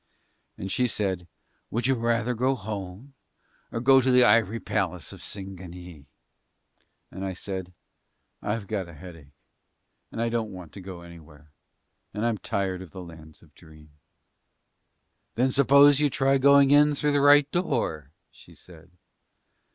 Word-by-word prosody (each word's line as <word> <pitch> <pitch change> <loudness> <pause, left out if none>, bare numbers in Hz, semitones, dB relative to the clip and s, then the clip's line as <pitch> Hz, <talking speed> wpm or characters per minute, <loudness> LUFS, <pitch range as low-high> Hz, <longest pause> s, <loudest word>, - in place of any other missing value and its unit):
And 95 - -6
she 125 +3 +1
said, 95 -6 -3 0.4
"Would 115 +1 -3
you 135 - +3
rather 115 0 0
go 130 +3 0
home 105 +3 -8 0.6
or 115 - -3
go 135 +2 +5
to 130 - 0
the 125 0 +6
ivory 115 -1 +3
palace 90 -7 -3
of - - -13
Singanee." 90 -5 -9 1.0
And 95 - -7
I 95 -1 -3
said, 95 -1 -6 0.7
"I've 105 0 -3
got 95 -4 -4
a 85 - -13
headache, 75 -4 -13 0.8
and - - -7
I 115 0 0
don't 115 -2 -2
want 90 -5 -11
to 100 - -10
go 90 -2 -9
anywhere, 80 -3 -15 0.6
and 105 +2 -2
I'm 115 -3 -1
tired 95 -2 -3
of 95 - -10
the 95 +3 -9
Lands 80 -2 -14
of 75 - -22
Dream." 75 -2 -18 1.4
"Then 130 +3 +1
suppose 140 +1 +5
you 150 -1 +2
try 135 0 +1
going 140 0 +5
in 145 0 +5
through 150 +1 0
the 145 -1 +2
right 145 0 +6
door," 80 - -2 0.2
she - - -18
said. 85 -1 -17
100 Hz, 150 wpm, -26 LUFS, 90-130 Hz, 1.4 s, the